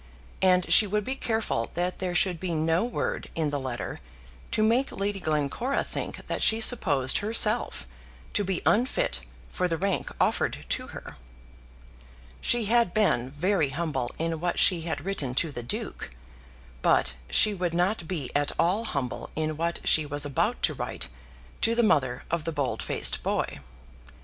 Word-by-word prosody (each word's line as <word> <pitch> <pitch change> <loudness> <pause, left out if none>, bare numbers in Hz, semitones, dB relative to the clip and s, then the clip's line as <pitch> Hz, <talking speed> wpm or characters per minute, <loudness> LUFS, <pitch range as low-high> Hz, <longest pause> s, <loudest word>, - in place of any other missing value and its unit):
And 185 -1 +4
she 215 - +9
would 210 +2 0
be 260 - -2
careful 220 - -1
that 180 +1 -2
there 180 -2 -2
should 180 -2 +2
be 175 -2 -2
no 160 +4 +1
word 240 - -3
in 155 -3 0
the 145 - -1
letter 130 -3 -5 0.5
to 215 - +1
make 240 +5 +2
Lady 200 0 -2
Glencora 155 - -1
think - - -6
that - - -3
she 220 - +5
supposed 150 - +3
herself 215 +2 +1 0.5
to 205 - +1
be 190 -2 -2
unfit 260 - +1 0.3
for 180 - -1
the 165 -2 -1
rank 195 +3 -1
offered - - 0
to - - 0
her. - - -10 1.2
She 240 -2 +4
had 235 -3 +2
been 130 - +2
very 160 +2 +1
humble 145 -4 -2
in 165 0 -2
what 175 +1 -1
she 180 -3 +4
had 160 -2 -4
written 145 -11 -1
to 160 +2 +1
the 120 - -5
Duke, 120 - -4 0.7
but - - +3 0.2
she 210 - +4
would 175 -3 -2
not 180 0 0
be 155 -8 -4
at 145 0 +2
all 195 +7 +1
humble 135 - -3
in 155 0 -1
what 170 +2 -2
she 155 -2 +4
was 145 0 -1
about 140 -2 -1
to - - +3
write - - -5 0.5
to 230 +1 +3
the 240 - +3
mother 130 - +2
of 170 -2 0
the 165 - -1
bold 145 -4 -2
faced - - +2
boy. - - -2
175 Hz, 170 wpm, -27 LUFS, 145-210 Hz, 1.2 s, she